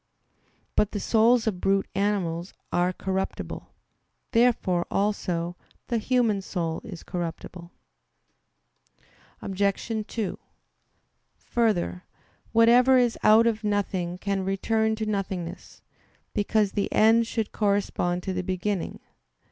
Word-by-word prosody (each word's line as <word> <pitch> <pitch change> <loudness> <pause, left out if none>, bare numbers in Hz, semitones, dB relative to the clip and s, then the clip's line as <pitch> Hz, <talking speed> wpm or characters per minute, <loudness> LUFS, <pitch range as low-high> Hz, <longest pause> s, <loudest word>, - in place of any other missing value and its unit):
But 210 - +2
the 205 - -2
souls 225 +3 +3
of 195 -5 -2
brute 195 0 +2
animals 190 -3 -1 0.2
are 175 +1 +2
corruptible. 190 +1 -4 0.6
Therefore, 230 -7 +2
also, 180 -4 -1 0.3
the 235 - +1
human 230 -4 +1
soul 170 -4 -3
is 170 - -9
corruptible. 170 0 -6 1.7
Obj. 200 +3 -1
2: 215 -5 -3 1.0
Further, 210 -6 0 0.5
whatever 240 +3 +6
is 245 -2 +3
out 220 +2 +6
of 225 -1 0
nothing 190 -4 -1
can 195 0 -2
return 220 +3 0
to 220 0 -3
nothingness; 190 -4 -4 0.5
because 210 0 +1
the 205 - -2
end 225 +1 +4
should 225 -2 -2
correspond 200 -4 0
to 190 - -2
the 180 - -1
beginning. 185 +1 -3
200 Hz, 110 wpm, -26 LUFS, 180-220 Hz, 1.7 s, whatever